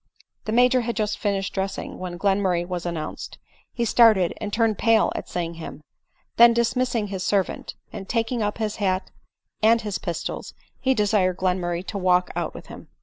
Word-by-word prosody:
The 215 Hz, -, -2 dB
Major 250 Hz, +2 st, +4 dB
had 235 Hz, 0 st, -3 dB
just 215 Hz, -2 st, -1 dB
finished 195 Hz, -2 st, -1 dB
dressing, 195 Hz, 0 st, -4 dB
when 180 Hz, -1 st, -5 dB
Glen 195 Hz, +2 st, +1 dB
murray 175 Hz, -3 st, +1 dB
was 175 Hz, -1 st, -4 dB
announced. 165 Hz, -3 st, -5 dB, 0.3 s
He 235 Hz, -, -1 dB
started 215 Hz, -6 st, +5 dB
and 210 Hz, -, -3 dB
turned 225 Hz, -1 st, +1 dB
pale 225 Hz, -2 st, +4 dB
at -, -, -5 dB
seeing 170 Hz, -1 st, -3 dB
him; 155 Hz, -, -8 dB, 0.5 s
then 235 Hz, 0 st, +8 dB
dismissing 235 Hz, -2 st, 0 dB
his 190 Hz, -2 st, -4 dB
servant, 195 Hz, -1 st, -1 dB, 0.2 s
and 195 Hz, -2 st, -8 dB
taking 230 Hz, +1 st, 0 dB
up 210 Hz, 0 st, -1 dB
his 215 Hz, -1 st, -2 dB
hat 190 Hz, -2 st, -1 dB, 0.5 s
and 225 Hz, +2 st, +5 dB
his 210 Hz, -3 st, -3 dB
pistols, 170 Hz, -4 st, -5 dB, 0.2 s
he 265 Hz, 0 st, +2 dB
desired 205 Hz, -4 st, +2 dB
Glenmurray 180 Hz, -1 st, -1 dB
to 200 Hz, -, -4 dB
walk 180 Hz, -1 st, +2 dB
out -, -, -3 dB
with -, -, -9 dB
him. -, -, -11 dB
205 Hz, 180 wpm, -24 LUFS, 185-225 Hz, 0.5 s, then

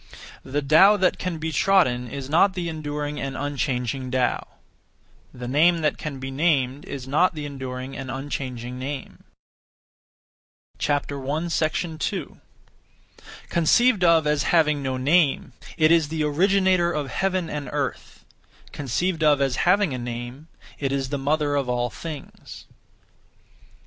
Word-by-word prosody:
The 145 Hz, +2 st, -2 dB
Tao 190 Hz, +9 st, +6 dB
that 185 Hz, -2 st, +1 dB
can 180 Hz, -3 st, -3 dB
be 160 Hz, +1 st, -3 dB
trodden 145 Hz, -8 st, +2 dB
is 135 Hz, +2 st, -6 dB
not 180 Hz, +6 st, +3 dB
the 175 Hz, -2 st, -3 dB
enduring 150 Hz, -2 st, -4 dB
and 135 Hz, -1 st, -4 dB
unchanging 130 Hz, -2 st, -2 dB
Tao. 125 Hz, -1 st, 0 dB, 0.8 s
The 125 Hz, -1 st, -8 dB
name 165 Hz, +6 st, +3 dB
that 150 Hz, -, 0 dB
can 150 Hz, -3 st, -5 dB
be 135 Hz, 0 st, -5 dB
named 140 Hz, -2 st, 0 dB
is 135 Hz, -2 st, -7 dB
not 160 Hz, +6 st, +2 dB
the 150 Hz, -1 st, -5 dB
enduring 130 Hz, -2 st, -6 dB
and 135 Hz, -1 st, -6 dB
unchanging 130 Hz, -2 st, -5 dB
name. 135 Hz, +1 st, -6 dB, 1.6 s
2. 155 Hz, +3 st, -2 dB, 1.1 s
(Conceived 200 Hz, +6 st, +3 dB
of 165 Hz, -2 st, +5 dB
as) 150 Hz, -1 st, +1 dB
having 150 Hz, -4 st, +2 dB
no 130 Hz, -1 st, -2 dB
name, 140 Hz, -1 st, +2 dB, 0.2 s
it 155 Hz, -1 st, +4 dB
is 165 Hz, -3 st, +4 dB
the 155 Hz, 0 st, -2 dB
Originator 185 Hz, +3 st, +2 dB
of 145 Hz, -5 st, -3 dB
heaven 185 Hz, -3 st, -1 dB
and 145 Hz, -4 st, -5 dB
earth; -, -, -4 dB, 0.5 s
(conceived 160 Hz, +5 st, -2 dB
of 150 Hz, -2 st, +4 dB
as) 135 Hz, -3 st, +1 dB
having 190 Hz, -4 st, +3 dB
a 125 Hz, -, -3 dB
name, 120 Hz, +5 st, -6 dB, 0.3 s
it 135 Hz, -2 st, -1 dB
is 135 Hz, -1 st, -1 dB
the 145 Hz, 0 st, -2 dB
Mother 145 Hz, +1 st, 0 dB
of 140 Hz, -3 st, -1 dB
all 120 Hz, 0 st, 0 dB
things. 155 Hz, -4 st, -9 dB
145 Hz, 135 wpm, -24 LUFS, 135-165 Hz, 1.6 s, Tao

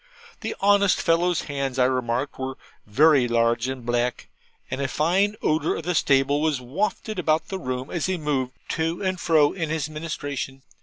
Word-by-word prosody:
The -, -, -4 dB
honest 200 Hz, -1 st, +4 dB
fellow's 170 Hz, +1 st, +2 dB
hands, 140 Hz, -3 st, -3 dB
I 125 Hz, -, +4 dB
remarked, 130 Hz, +1 st, -1 dB
were 130 Hz, 0 st, -4 dB, 0.3 s
very 140 Hz, +3 st, +5 dB
large 115 Hz, 0 st, +1 dB
and 130 Hz, -2 st, -5 dB
black; 120 Hz, 0 st, -1 dB, 0.4 s
and 130 Hz, -, -2 dB
a 135 Hz, -, 0 dB
fine 180 Hz, +10 st, +1 dB
odour 155 Hz, +1 st, +1 dB
of -, -, -5 dB
the 180 Hz, +2 st, -1 dB
stable 140 Hz, -1 st, +3 dB
was 155 Hz, -4 st, +1 dB
wafted 195 Hz, -, -3 dB
about 160 Hz, -2 st, +1 dB
the 190 Hz, -, -3 dB
room 130 Hz, -3 st, -4 dB
as 170 Hz, -2 st, -1 dB
he 185 Hz, -1 st, 0 dB
moved 140 Hz, -5 st, -1 dB, 0.2 s
to 165 Hz, +3 st, -1 dB
and 185 Hz, -1 st, -1 dB
fro 155 Hz, -4 st, +3 dB
in 165 Hz, -4 st, -3 dB
his 155 Hz, -1 st, -2 dB
ministration. 145 Hz, -4 st, -5 dB
145 Hz, 175 wpm, -24 LUFS, 130-165 Hz, 0.4 s, very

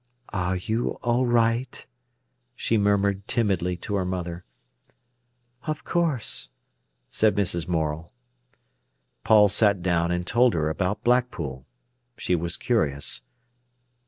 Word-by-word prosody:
"Are 90 Hz, -1 st, 0 dB
you 110 Hz, +6 st, -2 dB
all 120 Hz, +1 st, +2 dB
right?" 120 Hz, +1 st, +1 dB, 0.7 s
she 115 Hz, -, 0 dB
murmured 100 Hz, -1 st, +1 dB
timidly 95 Hz, -6 st, 0 dB
to -, -, -3 dB
her 95 Hz, -, 0 dB
mother. 90 Hz, -1 st, -4 dB, 1.2 s
"Of 155 Hz, -1 st, -3 dB
course," 160 Hz, -9 st, -1 dB, 0.6 s
said 110 Hz, -2 st, +2 dB
Mrs. 85 Hz, -5 st, -1 dB
Morel. 80 Hz, -1 st, -2 dB, 1.1 s
Paul 105 Hz, -1 st, +6 dB
sat 100 Hz, -2 st, +2 dB
down 85 Hz, -2 st, +1 dB
and 90 Hz, 0 st, -1 dB
told 120 Hz, +2 st, +3 dB
her 80 Hz, -1 st, 0 dB
about 90 Hz, +4 st, -2 dB
Blackpool. 90 Hz, -, 0 dB, 0.5 s
She -, -, -1 dB
was 85 Hz, 0 st, 0 dB
curious. 75 Hz, -, 0 dB
100 Hz, 110 wpm, -25 LUFS, 85-115 Hz, 1.2 s, Paul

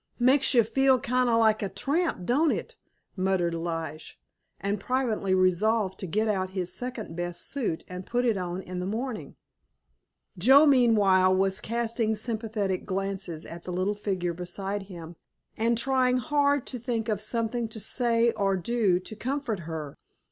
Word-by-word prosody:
"Makes 260 Hz, +2 st, +3 dB
you 235 Hz, -, +7 dB
feel 260 Hz, +4 st, +3 dB
kind 250 Hz, +1 st, +1 dB
of 230 Hz, -, +3 dB
like 220 Hz, -1 st, +3 dB
a 200 Hz, -, -2 dB
tramp, 290 Hz, -, -1 dB
don't 295 Hz, -, +3 dB
it?" -, -, -3 dB, 0.4 s
muttered 185 Hz, -3 st, +1 dB
Lige, 165 Hz, -, -5 dB, 0.4 s
and 200 Hz, +2 st, -2 dB
privately 220 Hz, -5 st, 0 dB
resolved 190 Hz, +2 st, +2 dB
to 190 Hz, -, -4 dB
get 215 Hz, +7 st, 0 dB
out 190 Hz, -3 st, 0 dB
his 180 Hz, -1 st, -2 dB
second 245 Hz, -9 st, -5 dB
best 175 Hz, 0 st, -3 dB
suit 240 Hz, -, -2 dB
and 180 Hz, 0 st, -7 dB
put 245 Hz, +5 st, -1 dB
it 230 Hz, -3 st, +2 dB
on 180 Hz, 0 st, -4 dB
in 180 Hz, 0 st, -6 dB
the 180 Hz, -, -3 dB
morning. 220 Hz, -, -4 dB, 1.0 s
Joe 265 Hz, -, +7 dB
meanwhile 205 Hz, -9 st, +5 dB
was 190 Hz, +1 st, +1 dB
casting 230 Hz, -1 st, -1 dB
sympathetic 215 Hz, -4 st, -2 dB
glances 195 Hz, -4 st, -3 dB
at 170 Hz, 0 st, -9 dB
the 180 Hz, -, -4 dB
little 185 Hz, +3 st, 0 dB
figure 190 Hz, -4 st, -2 dB
beside 190 Hz, +4 st, -4 dB
him, 170 Hz, -2 st, -9 dB, 0.4 s
and 230 Hz, +1 st, +1 dB
trying 255 Hz, 0 st, +2 dB
hard 285 Hz, 0 st, +1 dB
to 250 Hz, -, -5 dB
think 230 Hz, -1 st, -2 dB
of 210 Hz, -3 st, -1 dB
something 230 Hz, +1 st, -1 dB
to 220 Hz, 0 st, -8 dB
say 235 Hz, +2 st, +2 dB
or 195 Hz, -3 st, 0 dB
do 200 Hz, -2 st, +1 dB
to 220 Hz, -, -8 dB
comfort 250 Hz, -2 st, -2 dB
her. 155 Hz, -3 st, -6 dB
210 Hz, 160 wpm, -27 LUFS, 185-240 Hz, 1.0 s, you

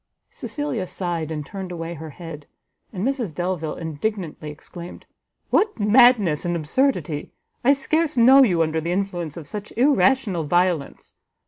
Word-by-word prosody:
Cecilia 255 Hz, -10 st, -4 dB
sighed, 170 Hz, -5 st, -3 dB
and 150 Hz, -2 st, -4 dB
turned 190 Hz, 0 st, -7 dB
away 165 Hz, -1 st, -5 dB
her 160 Hz, -1 st, -8 dB
head; 155 Hz, -1 st, -10 dB, 0.4 s
and 190 Hz, 0 st, -3 dB
Mrs 250 Hz, -, -2 dB
Delvile 175 Hz, -3 st, -2 dB
indignantly 160 Hz, 0 st, -4 dB
exclaimed, 170 Hz, +4 st, -10 dB, 0.5 s
"What 425 Hz, -, +2 dB
madness 210 Hz, -, +5 dB
and 175 Hz, 0 st, -1 dB
absurdity! 165 Hz, -, 0 dB, 0.3 s
I 270 Hz, +3 st, +6 dB
scarce 310 Hz, +1 st, 0 dB
know 260 Hz, +4 st, +8 dB
you 180 Hz, -10 st, +4 dB
under 160 Hz, 0 st, -1 dB
the 170 Hz, +2 st, -2 dB
influence 175 Hz, -5 st, -3 dB
of 165 Hz, -, -7 dB
such 205 Hz, +7 st, -6 dB
irrational 260 Hz, -, +3 dB
violence. 175 Hz, -1 st, -1 dB
180 Hz, 140 wpm, -23 LUFS, 160-235 Hz, 0.5 s, know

